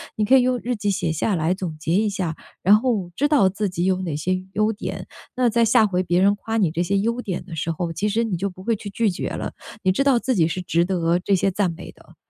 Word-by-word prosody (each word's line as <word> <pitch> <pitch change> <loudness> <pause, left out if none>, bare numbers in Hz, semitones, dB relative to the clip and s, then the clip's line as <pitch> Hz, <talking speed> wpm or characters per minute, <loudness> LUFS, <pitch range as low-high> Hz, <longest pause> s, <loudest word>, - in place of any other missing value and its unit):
你 215 - 0
可 265 +5 +6
以 - - +5
用 250 -1 +1
日 245 +1 -1
记 205 -2 -1
写 170 -4 -1
下 185 +5 0
来 165 +3 0
总 180 -5 -5
结 160 +2 -1
一 210 +3 +3
下， 185 -6 -2 0.3
然 200 +4 +6
后 215 -8 -1
知 290 - +2
道 275 -11 +4
自 205 +2 -2
己 175 0 -2
有 185 0 +1
哪 170 -5 -3
些 180 +5 0 0.2
优 215 +2 +2
点， 215 - -6 0.3
那 250 -2 +2
在 230 +1 +3
下 225 -1 +4
回 185 -1 0
别 175 0 +1
人 200 +1 +4
夸 225 +2 -3
你 190 -7 +3
这 170 +3 -1
些 195 +3 0
优 235 +4 -1
点 185 -6 -4
的 170 -3 -8
时 165 +1 -2
候， 170 +1 -3
其 200 +6 -1
实 230 +3 +1
你 210 -5 -2
就 200 +3 -1
不 185 0 -13
会 230 +2 +1
去 205 0 -8
拒 215 +1 +1
绝 175 - -3
了， - - -5 0.3
你 185 - +3
知 195 - +1
道 275 -3 +4
自 260 - 0
己 165 -3 +3
是 185 +2 -3
值 170 -1 +1
得 175 -1 +1
这 195 +2 +1
些 195 +2 +1
赞 185 -2 0
美 165 - -9
的， - - -21
195 Hz, 300 characters per minute, -22 LUFS, 175-220 Hz, 0.3 s, 可